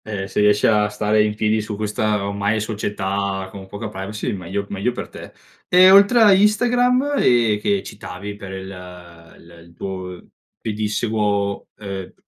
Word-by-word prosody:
Eh, 100 -3 -4
se - - -3
riesci 105 0 +3
a 105 -1 +3
stare 105 0 +1
in 105 0 -1
piedi 110 0 +1
su 105 0 -5
questa 105 0 -1
ormai 100 +2 -1
società 100 -2 -3
con 95 -1 -10
poca 100 +3 -6
privacy, 100 +1 -5
meglio 95 +1 -4
meglio 100 +5 -1
per - - -7
te. - - -11 0.4
E 185 +1 +7
oltre 200 +5 +6
a 205 -2 +7
Instagram 245 +7 +2
e 115 -4 +3
che 200 - 0
citavi 100 -1 -8
per 95 -2 -9
il 95 0 -7 0.7
il 85 0 -16
il 85 - -19
tuo 95 -2 -6 0.4
pedissequo, 105 -2 -1
uhm, 100 -3 -7
105 Hz, 155 wpm, -20 LUFS, 100-110 Hz, 0.7 s, E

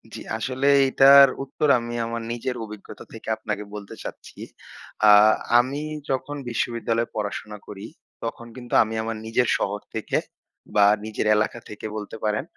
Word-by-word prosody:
জি - - -7 0.2
আসলে 130 +4 -2 0.2
এইটার 140 +1 +8 0.2
উত্তর 145 +2 -2
আমি 120 0 -6
আমার 115 0 -4
নিজের 120 +2 -3
অভিজ্ঞতা 105 -2 -11
থেকে - - -11
আপনাকে 105 - -4
বলতে 100 -1 -8
চাচ্ছি। - - -10 0.7
আ - - +9 0.5
আমি 135 +4 -1 0.3
যখন 135 +2 -2
বিশ্ববিদ্যালয়ে 115 0 -2
পড়াশোনা 105 0 -4
করি, 100 0 -9 0.4
তখন 120 - -5
কিন্তু 125 -2 -10
আমি 110 0 -6
আমার 115 0 -4
নিজের 115 +2 +1
শহর 100 +1 -2 0.2
থেকে - - -1 0.6
বা 105 -1 +6 0.2
নিজের 110 0 -3
এলাকা 110 +2 -1
থেকে 105 - -9
বলতে 105 0 -6
পারেন 105 +2 0
115 Hz, 150 wpm, -24 LUFS, 105-130 Hz, 0.7 s, আ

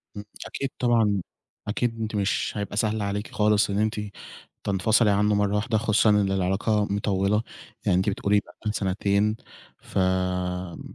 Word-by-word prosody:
إمم، 105 - -6 0.2
أكيد 135 - -3
طبعًا، 110 -5 +2 0.5
أكيد، 115 +2 -1
أنتِ 110 0 -3
مش 100 -1 0
هيبقى 105 -1 -4
سهل 110 0 +1
عليكِ 105 +1 -2
خالص 105 -1 +3
إن 100 +1 0
أنتِ 110 +1 +1 0.7
تنفصلي 105 +3 +3
عنه 105 +1 +3
مرة 100 0 +1
واحدة، 110 +2 +1
خصوصًا 110 0 +3
إن 105 -2 +3
العلاقة 95 +3 +1
مطولة، 100 +1 +1 0.4
يعني 90 - +3
أنتِ 95 +3 +2
بتقولي 100 +1 +2
بقا - - -15 0.2
لِك - - -1
سنتين، 100 +2 +1 0.5
ف - - -7
آآ 90 -1 -1
105 Hz, 155 wpm, -25 LUFS, 95-110 Hz, 0.7 s, خالص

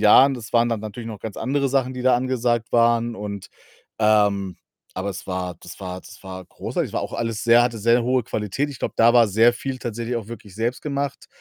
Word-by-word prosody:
Jahren, 130 +6 +7
das 120 -4 -9
waren 120 0 +4
dann 115 -2 -1
natürlich 110 +2 -7
noch 110 -3 -7
ganz 110 -3 -6
andere 140 +1 0
Sachen, 130 -1 +1
die 125 - -6
da 130 -1 +5
angesagt 120 -2 -1
waren 115 0 +3
und, 100 -2 -6 0.5
ähm 105 -3 +2 0.4
aber 95 +2 -3
es 95 - -8
war 90 -2 -3
das - - -11
war 90 -1 -6
das - - -14
war 95 -1 -7
großartig. - - -3
Es - - -14
war - - 0
auch - - -6
alles 115 -1 -3
sehr 120 0 +6
hatte 120 -1 0
sehr 115 +3 +3
hohe 125 +1 +1
Qualität. 110 +8 -2
Ich 140 - -9
glaube, - - -3
da 115 +1 +6
war 120 -3 +5
sehr 115 +4 +5
viel 130 +2 -4
tatsächlich 120 +1 -3
auch 115 -3 -5
wirklich 105 -4 -10
selbst 115 +4 -2
gemacht. 140 -2 -3
115 Hz, 225 wpm, -23 LUFS, 105-125 Hz, 0.5 s, Jahren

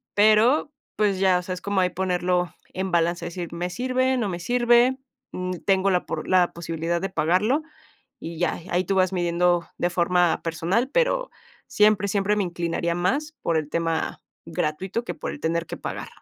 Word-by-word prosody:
pero, 220 +8 +4 0.3
pues 205 -3 +1
ya, 190 -2 +4
o 180 - -7
sea, 185 - -4
es 180 - -7
como 200 -1 0
ahí 180 - +2
ponerlo 180 -1 0 0.2
en 190 +1 -2
balance, 170 0 +1
decir, 170 0 -5
me 175 +1 -3
sirve, 255 +5 0
no 220 -5 -1
me 175 -2 -4
sirve, 240 +4 +3 0.4
mm, 180 0 -3
tengo 195 0 +3
la 180 -1 +1
por - - -4
la 180 -2 +3
posibilidad 170 0 -3
de 195 - -2
pagarlo, 190 - +1 0.6
y 165 0 -7
ya, 175 - 0
ahí 175 +1 +2
tú 195 +2 -1
vas 185 0 +3
midiendo 175 -1 +1
de 175 - +1
forma 175 -1 +2
personal, 170 +10 0
pero - - +1 0.4
siempre 210 -1 +3
siempre 200 +1 +1
me 205 - +1
inclinaría 170 -1 -2
más 285 +13 -1
por 165 - +1
el 150 -1 -2
tema 165 -1 -1 0.3
gratuito, 185 +9 -2
que - - -4
por - - -5
el - - -8
tener 170 +1 -1
que - - -6
pagar. - - -6
180 Hz, 185 wpm, -24 LUFS, 170-210 Hz, 0.6 s, pero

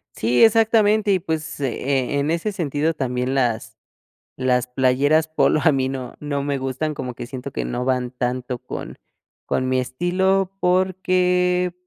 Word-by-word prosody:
Sí, 120 +3 +3
exactamente, 220 -1 +4
y, 190 - +3
pues, 160 -4 -4
e 135 +1 -1
en 140 +2 0
ese 170 +6 -1
sentido 160 -4 -1
también 125 -3 -2
las 115 -4 -1 0.6
las 125 -1 +1
playeras 135 +5 +2
polo 155 -1 +2
a 160 -3 +4
mí 130 -1 0
no 130 -2 -5
no 145 -1 -2
me 140 0 -1
gustan, 135 +4 -2
como 125 -3 -5
que 120 - -7
siento 130 +1 -7
que - - -3
no 120 +1 -3
van 125 -1 0
tanto 125 0 -3
con - - -7 0.5
con 130 - -1
mi 130 0 +1
estilo 185 +8 0
porque, 180 -1 +2
140 Hz, 155 wpm, -22 LUFS, 130-180 Hz, 0.6 s, exactamente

